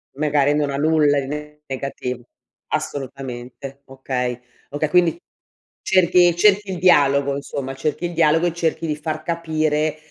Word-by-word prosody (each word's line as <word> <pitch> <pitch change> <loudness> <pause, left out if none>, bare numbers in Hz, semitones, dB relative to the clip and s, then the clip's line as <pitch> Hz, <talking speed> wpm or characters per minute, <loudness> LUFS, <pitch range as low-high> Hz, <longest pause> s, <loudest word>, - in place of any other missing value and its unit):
Magari 145 -1 +2
non 150 -1 0
ha 140 - -3
nulla 150 -1 +3
di 135 - -4 0.4
negativo. 130 -2 -5 0.5
Assolutamente, 135 0 -5
okay 125 -2 -3 0.3
okay, 145 +1 -2
quindi 175 -2 +3 0.6
cerchi 175 -2 +4
cerchi 205 +2 +3
il 180 - -4
dialogo, 140 -5 +4
insomma, 140 -1 -5
cerchi 150 +5 -2
il 175 - -4
dialogo 165 +1 +3
e 170 - -2
cerchi 165 -1 -1
di 150 - -1
far 155 +1 -4
capire 155 -2 -1
150 Hz, 135 wpm, -21 LUFS, 140-165 Hz, 0.6 s, cerchi